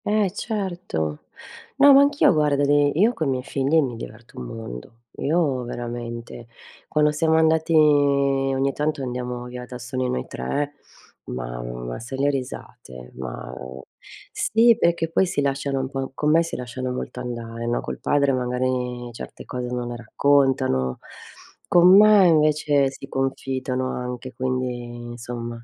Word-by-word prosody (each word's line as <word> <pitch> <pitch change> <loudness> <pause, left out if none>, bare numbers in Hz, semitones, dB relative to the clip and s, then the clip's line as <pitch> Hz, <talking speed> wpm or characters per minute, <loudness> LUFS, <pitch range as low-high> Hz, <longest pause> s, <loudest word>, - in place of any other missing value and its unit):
Eh 210 -2 +2
certo. 180 - -3 0.5
No, 280 0 +8
ma 275 - +8
anch'io 285 -7 +4
guarda 150 -2 +2
dei 145 0 +3
io 225 +5 +4
coi 160 -10 -2
miei 130 -1 -1
figli 140 +3 +1
mi 125 -3 -3
diverto 115 0 -10
un 60 - -6
mondo. 115 - -9 0.2
Io 145 -4 +1
veramente, 120 -1 -6 0.4
quando 150 0 +2
siamo 160 +1 +1
andati 160 0 +3
ogni 140 -2 +3
tanto 150 -1 -2
andiamo 125 -1 -4
via 125 0 -7
da 125 0 -8
soli 125 +1 -3
noi 65 - -2
3, 145 - -3 0.5
ma - - -5
ma - - -6
sai 125 +3 -7
le 140 +1 +2
risate, 65 - -7
ma 65 -1 -7 0.8
sì, 230 +1 +4
perché 165 -3 +1
poi 190 +3 +2
si 170 - -2
lasciano 140 0 -1
un 130 - -4
po 135 -1 -4
con 150 +1 +1
me 165 +2 +5
si 165 - -4
lasciano 125 +1 -4
molto 125 0 -5
andare, 115 -1 -5
no, 120 - 0
col - - -6
padre 140 -1 +2
magari 125 -1 -2
certe - - -9
cose 125 -1 -4
non 125 0 -3
le 120 0 -5
raccontano. 130 - +1 0.7
Con 180 +1 +7
me 210 -2 +7
invece 150 -3 +3
si 135 0 -10
confidano 130 -1 -2
anche, 125 +1 -5
quindi 125 -1 -3
insomma. 120 0 -7
130 Hz, 150 wpm, -23 LUFS, 120-150 Hz, 0.8 s, No